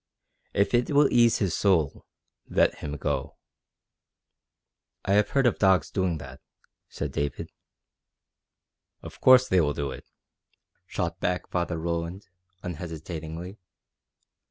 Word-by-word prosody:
If 100 Hz, +4 st, +2 dB
it 120 Hz, 0 st, +2 dB
will 145 Hz, -1 st, +5 dB
ease 120 Hz, -1 st, +5 dB
his 95 Hz, -6 st, 0 dB
soul, 85 Hz, -8 st, +1 dB, 0.4 s
let -, -, +2 dB
him 75 Hz, -1 st, -5 dB
go." 70 Hz, -1 st, -3 dB, 1.7 s
"I 100 Hz, -, +1 dB
have 105 Hz, 0 st, +3 dB
heard 135 Hz, -1 st, +2 dB
of 120 Hz, -, +2 dB
dogs 95 Hz, -2 st, +3 dB
doing 95 Hz, -4 st, 0 dB
that," 65 Hz, -2 st, -11 dB, 0.5 s
said -, -, -4 dB
David. 70 Hz, -2 st, -3 dB, 1.5 s
"Of -, -, -11 dB
course 130 Hz, 0 st, +7 dB
they 95 Hz, -1 st, +3 dB
will 75 Hz, -2 st, +1 dB
do 70 Hz, -2 st, -3 dB
it," -, -, -10 dB, 0.8 s
shot 85 Hz, -4 st, -3 dB
back 90 Hz, 0 st, -1 dB
Father 85 Hz, -1 st, -1 dB
Roland 85 Hz, +3 st, -3 dB, 0.4 s
unhesitatingly. 85 Hz, +2 st, -6 dB
90 Hz, 120 wpm, -26 LUFS, 80-100 Hz, 1.7 s, course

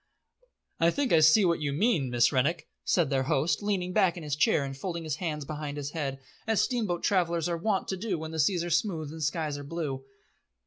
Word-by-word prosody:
"I 165 Hz, -, +4 dB
think 270 Hz, +6 st, 0 dB
I 165 Hz, -, +7 dB
see 155 Hz, +6 st, +6 dB
what 170 Hz, -3 st, +1 dB
you 145 Hz, -1 st, -1 dB
mean, 165 Hz, -, +1 dB
Miss 120 Hz, 0 st, +3 dB
Rennick," 150 Hz, +6 st, 0 dB, 0.2 s
said 165 Hz, -6 st, +1 dB
their 135 Hz, -1 st, +2 dB
host, 150 Hz, +6 st, +1 dB
leaning 190 Hz, -3 st, -1 dB
back 190 Hz, -4 st, +3 dB
in 170 Hz, -, -7 dB
his 145 Hz, -2 st, -2 dB
chair 150 Hz, -1 st, +3 dB
and 135 Hz, 0 st, -6 dB
folding 170 Hz, +4 st, -4 dB
his 155 Hz, -2 st, -3 dB
hands 150 Hz, -4 st, -3 dB
behind 150 Hz, -1 st, -5 dB
his 145 Hz, 0 st, -4 dB
head, 140 Hz, -5 st, -3 dB, 0.3 s
as 220 Hz, -2 st, +2 dB
steamboat 215 Hz, -9 st, 0 dB
travellers 170 Hz, -4 st, +1 dB
are 170 Hz, -, -1 dB
wont 195 Hz, +3 st, -1 dB
to 190 Hz, -, -2 dB
do 195 Hz, -2 st, -2 dB
when 160 Hz, 0 st, -6 dB
seas 170 Hz, +3 st, +2 dB
are 175 Hz, -, -4 dB
smooth 165 Hz, -4 st, 0 dB
and 160 Hz, 0 st, -8 dB
skies 150 Hz, -1 st, -1 dB
are -, -, -7 dB
blue. 140 Hz, -3 st, -4 dB
165 Hz, 220 wpm, -28 LUFS, 145-180 Hz, 0.3 s, I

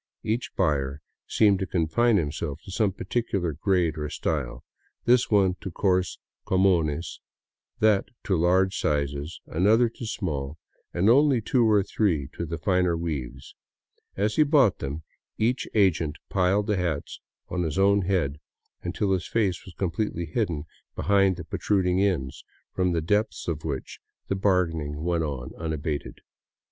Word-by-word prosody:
Each 115 Hz, +3 st, -1 dB
buyer 70 Hz, -2 st, 0 dB, 0.3 s
seemed 100 Hz, -3 st, +3 dB
to 95 Hz, -, -2 dB
confine 95 Hz, +8 st, +2 dB
himself 75 Hz, -2 st, -3 dB
to 95 Hz, -, -9 dB
some 100 Hz, +1 st, +1 dB
particular 95 Hz, -3 st, -2 dB
grade 85 Hz, 0 st, +1 dB
or 75 Hz, 0 st, -3 dB
style; -, -, -3 dB, 0.4 s
this 125 Hz, 0 st, +4 dB
one 95 Hz, -3 st, +3 dB
to -, -, -5 dB
coarse 90 Hz, -1 st, 0 dB
" -, -, -60 dB
comunes," 85 Hz, -4 st, +1 dB, 0.6 s
that 105 Hz, -2 st, +3 dB
to 95 Hz, -, +1 dB
large 95 Hz, +3 st, +3 dB
sizes, 70 Hz, +1 st, -2 dB
an 90 Hz, +5 st, 0 dB
other 115 Hz, +2 st, +5 dB
to 115 Hz, 0 st, -8 dB
small, 75 Hz, -9 st, -3 dB, 0.3 s
and 90 Hz, +3 st, +1 dB
only 135 Hz, +2 st, +5 dB
two 115 Hz, +1 st, +2 dB
or 105 Hz, -2 st, +4 dB
three 90 Hz, -9 st, 0 dB
to 85 Hz, -, -4 dB
the 85 Hz, +1 st, -4 dB
finer 90 Hz, -2 st, +1 dB
weaves. 75 Hz, -7 st, -5 dB, 0.6 s
As 105 Hz, +2 st, 0 dB
he -, -, +6 dB
bought 140 Hz, -, +4 dB
them, 75 Hz, +4 st, -5 dB, 0.3 s
each 120 Hz, +4 st, 0 dB
agent 85 Hz, -7 st, +2 dB
piled 95 Hz, +2 st, +2 dB
the 105 Hz, -1 st, 0 dB
hats 85 Hz, -5 st, -3 dB, 0.3 s
on 90 Hz, -, -2 dB
his 80 Hz, -4 st, -2 dB
own 100 Hz, +1 st, +4 dB
head 85 Hz, -7 st, 0 dB, 0.4 s
until 95 Hz, +3 st, -1 dB
his 95 Hz, -2 st, 0 dB
face 100 Hz, -6 st, 0 dB
was 95 Hz, -, -12 dB
completely 85 Hz, -1 st, -2 dB
hidden 85 Hz, -, -2 dB, 0.3 s
behind 100 Hz, -1 st, +3 dB
the -, -, -7 dB
protruding 95 Hz, -2 st, 0 dB
ends, 85 Hz, -10 st, -1 dB, 0.3 s
from 90 Hz, -1 st, +1 dB
the 85 Hz, -, 0 dB
depths 105 Hz, +7 st, 0 dB
of 80 Hz, -3 st, -3 dB
which 70 Hz, -4 st, -5 dB, 0.3 s
the 95 Hz, -, +1 dB
bargaining 80 Hz, -6 st, 0 dB
went 85 Hz, -1 st, 0 dB
on 70 Hz, -5 st, -5 dB
unabated. 80 Hz, -2 st, -4 dB
90 Hz, 155 wpm, -26 LUFS, 80-100 Hz, 0.6 s, he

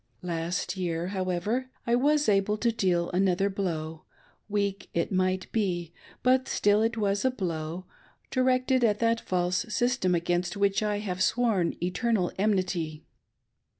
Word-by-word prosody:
Last 170 Hz, +2 st, -2 dB
year, 175 Hz, -1 st, -2 dB
however, 195 Hz, +7 st, -1 dB, 0.2 s
I 235 Hz, -, +1 dB
was 290 Hz, +4 st, +3 dB
able 205 Hz, 0 st, +2 dB
to 235 Hz, +2 st, +1 dB
deal 180 Hz, -6 st, 0 dB
another 190 Hz, +1 st, +2 dB
blow 160 Hz, -5 st, -3 dB, 0.2 s
— -, -, -31 dB, 0.2 s
weak, 200 Hz, -1 st, -1 dB
it 170 Hz, +3 st, 0 dB
might 185 Hz, 0 st, +1 dB
be, 175 Hz, -6 st, -1 dB, 0.3 s
but 255 Hz, +1 st, +3 dB
still 205 Hz, +1 st, +3 dB
it 225 Hz, +1 st, 0 dB
was 200 Hz, -1 st, 0 dB
a 260 Hz, -, +4 dB
blow 175 Hz, -6 st, -4 dB, 0.2 s
— -, -, -35 dB
directed 255 Hz, 0 st, +2 dB
at 210 Hz, -3 st, +3 dB
that 230 Hz, 0 st, +1 dB
false 180 Hz, 0 st, 0 dB
system 240 Hz, -7 st, +1 dB
against 175 Hz, +3 st, -1 dB
which 200 Hz, 0 st, +2 dB
I 210 Hz, -1 st, 0 dB
have 185 Hz, -3 st, -4 dB
sworn 220 Hz, -8 st, +2 dB
eternal 185 Hz, +1 st, 0 dB
enmity. 185 Hz, -6 st, 0 dB
195 Hz, 150 wpm, -28 LUFS, 175-225 Hz, 0.3 s, a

